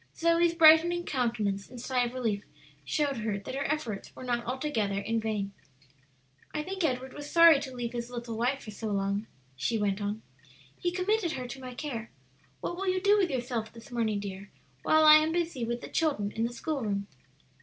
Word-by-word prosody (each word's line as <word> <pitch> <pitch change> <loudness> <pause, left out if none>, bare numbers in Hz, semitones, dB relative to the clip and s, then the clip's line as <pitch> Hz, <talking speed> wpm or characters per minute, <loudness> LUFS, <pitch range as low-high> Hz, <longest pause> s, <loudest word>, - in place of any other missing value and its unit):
Zoe's 335 0 +3
brightening 335 +2 +6
countenance 225 -7 -1
and 250 -1 -10
sigh 250 0 +1
of 240 +1 -6
relief 220 -5 -1 0.4
showed 285 -3 0
her 215 -2 -2
that 200 - -7
her 275 +2 -1
efforts 235 -10 -4
were - - -9
not 240 -1 -1
altogether 240 -7 -1
in 225 +3 -1
vain. 210 -3 -2 1.0
"I 300 - -1
think 380 +2 -4
Edward 260 -3 -1
was 290 0 -8
sorry 335 -3 +7
to 265 -2 -7
leave 240 -1 -4
his 240 0 -4
little 235 -2 -5
wife 250 +5 0
for 215 - -8
so 220 +2 -5
long," 200 +1 -1 0.3
she 225 - 0
went 205 -1 0
on. 205 +2 -3 0.5
"He 350 - -1
committed 365 -1 0
her 255 -3 -4
to 265 +2 -8
my 255 -1 -8
care. 240 -6 -5 0.5
What 345 - -3
will 390 +1 -3
you 370 0 +2
do 400 +2 +4
with 370 -3 +2
yourself 245 -4 -2
this 230 +3 -14
morning, 220 -4 0
dear, 200 0 -7 0.3
while 315 0 +4
I 305 0 +10
am 310 +1 +2
busy 335 -7 -1
with 235 +1 -3
the - - -7
children 280 -11 0
in 225 +2 -1
the 240 - -8
school 290 +3 -3
room?" 200 -3 -1
245 Hz, 200 wpm, -29 LUFS, 220-310 Hz, 1.0 s, I